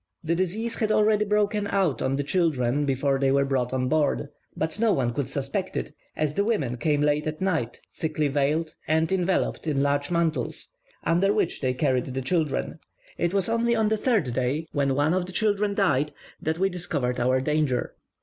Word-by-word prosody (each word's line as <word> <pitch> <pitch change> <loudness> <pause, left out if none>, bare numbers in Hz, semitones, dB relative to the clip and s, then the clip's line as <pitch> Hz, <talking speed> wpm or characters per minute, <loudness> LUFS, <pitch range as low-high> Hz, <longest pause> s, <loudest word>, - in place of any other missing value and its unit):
The 165 +1 0
disease 195 +7 -1
had 215 -2 +1
already 210 0 +3
broken 210 0 +1
out 190 -9 +1
on 135 - 0
the 145 - -1
children 145 -5 +1
before 135 0 +1
they 135 -1 +2
were 140 0 +3
brought 130 -3 0
on 130 -1 0
board; 150 -1 +1 0.3
but 160 +6 -2
no 225 -2 +3
one 120 -3 0
could 140 0 -2
suspect 140 +7 -3
it, 150 - -4 0.2
as 150 -1 -1
the 200 - +1
women 150 - 0
came 145 +2 +1
late 150 +1 +1
at 155 0 -3
night, 160 -11 -1
thickly 155 -2 -1
veiled, 150 +3 0
and 160 +2 +2
enveloped 185 -2 0
in 140 -2 +1
large 145 0 0
mantles, 170 -2 -1 0.3
under 180 +4 +3
which 205 -5 0
they 130 -2 0
carried 130 -2 +1
the 130 0 -4
children. 155 +1 -1 0.4
It 170 0 +1
was 195 -2 +1
only 235 +1 +1
on 220 -2 +2
the 220 - +2
third 210 - +1
day, 130 +6 -1
when 140 -2 +1
one 145 +4 +2
of 180 -1 0
the - - -7
children 205 -1 +1
died, 150 -7 +1 0.3
that 160 +1 -1
we 190 +2 +2
discovered 155 -9 -2
our 130 +2 +2
danger. 145 -2 0
155 Hz, 195 wpm, -26 LUFS, 135-190 Hz, 0.4 s, already